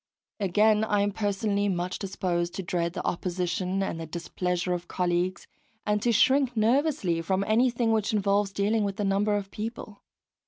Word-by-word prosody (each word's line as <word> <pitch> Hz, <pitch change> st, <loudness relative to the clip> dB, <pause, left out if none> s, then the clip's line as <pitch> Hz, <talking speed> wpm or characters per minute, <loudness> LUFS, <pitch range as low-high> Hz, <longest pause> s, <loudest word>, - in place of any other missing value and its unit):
Again, 210 Hz, +2 st, +3 dB
I 210 Hz, -2 st, +1 dB
am 205 Hz, 0 st, +1 dB
personally 205 Hz, 0 st, 0 dB
much 180 Hz, 0 st, -2 dB
disposed 175 Hz, -3 st, -2 dB
to 190 Hz, -, -4 dB
dread 170 Hz, -1 st, -1 dB
the -, -, -5 dB
opposition 180 Hz, +2 st, -1 dB
and 165 Hz, -3 st, -3 dB
the 165 Hz, -, -6 dB
displeasure 180 Hz, +2 st, -2 dB
of 175 Hz, 0 st, -4 dB
colleagues, 180 Hz, +1 st, -1 dB, 0.4 s
and 210 Hz, 0 st, +1 dB
to 240 Hz, -, +2 dB
shrink 260 Hz, +2 st, +3 dB
nervously 225 Hz, -, +2 dB
from 190 Hz, +3 st, 0 dB
anything 235 Hz, +2 st, +2 dB
which 220 Hz, -2 st, +1 dB
involves 200 Hz, -1 st, +1 dB
dealing 205 Hz, +2 st, +1 dB
with 200 Hz, 0 st, -3 dB
a -, -, +1 dB
number 200 Hz, +2 st, +2 dB
of 200 Hz, -1 st, -4 dB
people. 215 Hz, -1 st, -6 dB
200 Hz, 165 wpm, -27 LUFS, 180-215 Hz, 0.4 s, Again